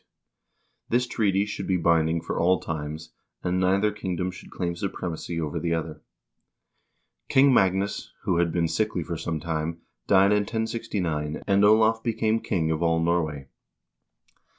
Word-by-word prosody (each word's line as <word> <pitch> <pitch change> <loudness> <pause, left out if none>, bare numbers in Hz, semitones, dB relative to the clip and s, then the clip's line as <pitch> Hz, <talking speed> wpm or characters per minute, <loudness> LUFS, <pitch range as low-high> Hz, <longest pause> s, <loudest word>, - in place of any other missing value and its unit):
This 125 +2 +2
treaty 100 -5 +1
should 105 - -5
be 95 - +2
binding 85 -1 +2
for - - -3
all 90 +1 +3
times, 80 0 -6 0.3
and 90 +1 0
neither 95 +3 +2
kingdom 90 -3 -3
should 90 - -12
claim 85 -2 -3
supremacy 85 -2 -4
over 80 +1 -2
the 85 +1 0
other. 80 -2 -5 1.3
King 135 0 +5
Magnus, 95 -1 +1
who 85 - +1
had 85 -1 +2
been 85 0 +1
sickly 105 -1 -1
for 85 +1 -4
some 80 0 -3
time, 80 +1 -3 0.2
died 100 0 +5
in 105 - +4
1069, 105 -9 -2
and 100 0 +3
Olav 110 +2 +5
became 110 -1 0
king 80 -8 -1
of 80 0 -1
all 80 -1 +2
Nor 85 +1 +2
way. 75 -3 -6
90 Hz, 150 wpm, -26 LUFS, 80-105 Hz, 1.3 s, King